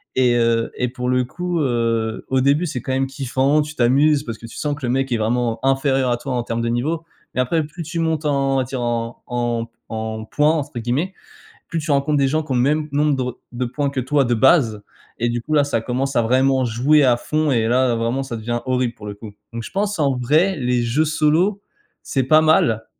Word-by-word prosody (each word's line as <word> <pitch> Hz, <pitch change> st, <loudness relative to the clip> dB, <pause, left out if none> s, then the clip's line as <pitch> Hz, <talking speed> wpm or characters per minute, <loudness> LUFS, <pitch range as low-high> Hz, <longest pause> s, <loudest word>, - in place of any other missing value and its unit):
et 125 Hz, -2 st, +3 dB
heu, 115 Hz, -1 st, +1 dB
et 125 Hz, -, -1 dB
pour 125 Hz, 0 st, -5 dB
le 125 Hz, 0 st, +2 dB
coup, 175 Hz, +5 st, -3 dB
heu, 115 Hz, -4 st, -1 dB
au 130 Hz, 0 st, +2 dB
début, 140 Hz, +6 st, +2 dB
c'est 130 Hz, -5 st, -4 dB
quand 130 Hz, -, -4 dB
même 135 Hz, 0 st, +1 dB
kiffant. 135 Hz, +2 st, +1 dB
Tu 150 Hz, 0 st, -6 dB
t'amuses 140 Hz, +4 st, +3 dB
parce 115 Hz, -5 st, -6 dB
que 115 Hz, -, -11 dB
tu 115 Hz, -, -11 dB
sens 145 Hz, -1 st, -1 dB
que 145 Hz, -3 st, -6 dB
le 120 Hz, -, 0 dB
mec 135 Hz, +1 st, 0 dB
est -, -, +2 dB
vraiment 115 Hz, +1 st, 0 dB
inférieur 135 Hz, -1 st, +2 dB
à 120 Hz, -, +1 dB
toi 130 Hz, +2 st, -5 dB
en 120 Hz, -1 st, -1 dB
termes 115 Hz, 0 st, -3 dB
de 115 Hz, -, -1 dB
niveau 155 Hz, +8 st, -1 dB, 0.3 s
et -, -, -1 dB
après, 155 Hz, +6 st, +1 dB
plus 160 Hz, +3 st, -8 dB
tu 165 Hz, +2 st, -4 dB
montes 160 Hz, -1 st, -1 dB
en 140 Hz, -2 st, +1 dB
on -, -, +2 dB
va 130 Hz, -, +2 dB
dire, 130 Hz, 0 st, -4 dB
en 115 Hz, -1 st, -3 dB
en 120 Hz, -1 st, -2 dB, 0.2 s
en 110 Hz, -1 st, -4 dB
«points» 150 Hz, +6 st, +2 dB
entre 145 Hz, -5 st, -3 dB
guillemets, 130 Hz, +11 st, -1 dB, 0.6 s
plus 165 Hz, -, -2 dB
tu 155 Hz, -, -5 dB
rencontres 140 Hz, +2 st, +1 dB
des 135 Hz, -1 st, +3 dB
gens 155 Hz, +3 st, 0 dB
qui 150 Hz, -3 st, -5 dB
ont -, -, +1 dB
le 120 Hz, -, +3 dB
même 150 Hz, +2 st, +1 dB
nombre 145 Hz, +1 st, +2 dB
de 130 Hz, -, -1 dB
re 125 Hz, -1 st, -5 dB
de 125 Hz, +1 st, -2 dB
points 140 Hz, +3 st, -2 dB
que 135 Hz, -, -2 dB
toi, 135 Hz, +2 st, +1 dB
de 120 Hz, -, 0 dB
base 115 Hz, -4 st, +3 dB, 0.4 s
et 120 Hz, -, +2 dB
du 120 Hz, 0 st, -2 dB
coup, 155 Hz, -, -6 dB
là, 145 Hz, -1 st, +4 dB
ça 140 Hz, -5 st, -1 dB
commence 130 Hz, +3 st, -2 dB
à 120 Hz, -, +4 dB
vraiment 130 Hz, +3 st, +2 dB
jouer 130 Hz, +6 st, +3 dB
à 125 Hz, -2 st, +4 dB
fond 155 Hz, +3 st, 0 dB
et 115 Hz, -3 st, +1 dB
là, 125 Hz, 0 st, +2 dB
vraiment, 115 Hz, +4 st, -1 dB
ça 120 Hz, -3 st, -5 dB
devient 120 Hz, +2 st, -3 dB
horrible, 125 Hz, -2 st, 0 dB
pour 105 Hz, -, -11 dB
le 105 Hz, -, -5 dB
coup, 105 Hz, 0 st, -10 dB, 0.2 s
donc 115 Hz, 0 st, -5 dB
je -, -, -8 dB
pense, 205 Hz, 0 st, -1 dB
en 140 Hz, -3 st, +2 dB
vrai, 155 Hz, +10 st, +2 dB
les 125 Hz, -3 st, 0 dB
jeux 120 Hz, +7 st, +1 dB
solo, 160 Hz, +7 st, +1 dB, 0.4 s
c'est 135 Hz, -, -1 dB
pas 155 Hz, +4 st, +5 dB
mal, 115 Hz, -8 st, +3 dB
130 Hz, 250 wpm, -20 LUFS, 120-150 Hz, 0.6 s, pas